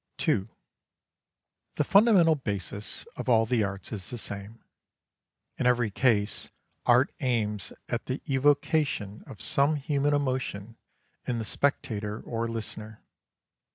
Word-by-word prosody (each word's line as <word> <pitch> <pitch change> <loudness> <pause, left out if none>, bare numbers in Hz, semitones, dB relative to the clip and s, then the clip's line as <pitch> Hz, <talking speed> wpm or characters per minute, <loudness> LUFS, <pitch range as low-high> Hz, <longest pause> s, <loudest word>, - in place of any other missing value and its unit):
II 95 - +2 1.3
The - - +2
fundamental 195 -2 +6
basis 105 - -2
of - - -4
all 115 -2 +5
the 115 -1 +1
arts 100 -1 -4
is 100 -5 -3
the 120 - -5
same. 100 +1 -6 1.0
In 125 - +2
every 120 -3 +2
case 105 -3 +1 0.4
art 125 +3 +5
aims 110 -6 -1 0.2
at - - -3
the - - -2
evocation 140 -6 +1
of - - -10
some 150 0 +3
human 145 0 +1
emotion 130 -6 -2 0.5
in 120 - 0
the 110 - -3
spectator 105 -6 -1
or 115 0 -3
listener. 110 -1 -6
115 Hz, 120 wpm, -28 LUFS, 105-140 Hz, 1.3 s, fundamental